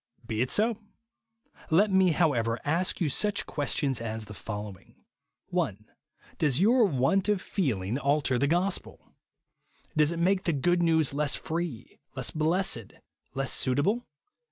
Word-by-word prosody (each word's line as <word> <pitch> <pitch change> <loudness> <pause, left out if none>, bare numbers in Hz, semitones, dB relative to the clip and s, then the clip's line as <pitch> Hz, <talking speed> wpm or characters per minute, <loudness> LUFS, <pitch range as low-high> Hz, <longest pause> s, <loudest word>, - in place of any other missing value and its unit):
Be 110 -1 -2
it 125 - 0
so. 220 +1 +1 0.9
Let 195 +6 +4
me, 190 -1 +4
however, 125 -9 +1
ask 170 +5 0
you 170 - +1
such 205 +8 0
questions 140 -4 -1
as 110 -1 -4
the 105 - -10
following: 105 -3 -8 0.3
— - - -58
1. - - -2 0.5
Does 145 -4 +2
your 230 +5 +5
want 185 +5 +1
of 205 -2 +2
feeling 125 - -2
alter 140 -3 +1
the 140 - +2
gospel? 180 +5 -2 0.8
Does 155 0 +3
it 170 - -4
make 185 +3 +1
the 170 - +1
good 175 +5 +1
news 160 -4 +2
less 145 0 0
free, 165 -7 -5 0.2
less - - -2
blessed, 160 - 0 0.4
less 135 0 0
suitable 160 - +1
155 Hz, 145 wpm, -28 LUFS, 130-185 Hz, 0.9 s, your